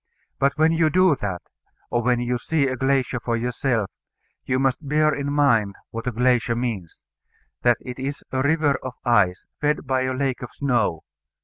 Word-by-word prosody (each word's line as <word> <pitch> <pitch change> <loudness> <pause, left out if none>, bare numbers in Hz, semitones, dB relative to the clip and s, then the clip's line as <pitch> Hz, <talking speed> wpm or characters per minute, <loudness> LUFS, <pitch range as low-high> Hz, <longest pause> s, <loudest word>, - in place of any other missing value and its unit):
But 140 +1 +2
when 160 +1 +4
you 165 -1 +3
do 185 -1 +4
that, 95 -5 -4 0.5
or 120 - +1
when 120 0 +2
you 120 0 -1
see 150 +2 +1
a 130 - -1
glacier 135 -2 0
for 115 0 -1
yourself, 120 -3 -1 0.5
you 130 - 0
must 135 +2 0
bear 155 0 +3
in 140 0 -2
mind 115 -9 +2 0.2
what 115 +2 -5
a - - +1
glacier 125 0 +2
means 115 -8 -4 0.6
that 120 -1 +4
it 125 0 -8
is 140 +2 -4
a 130 - 0
river 145 0 +2
of 130 -1 -6
ice, 100 -7 +2
fed 150 0 0
by 130 0 +1
a 130 - -1
lake 130 -1 -1
of 125 - -6
snow. 120 - 0
130 Hz, 185 wpm, -23 LUFS, 120-140 Hz, 0.6 s, when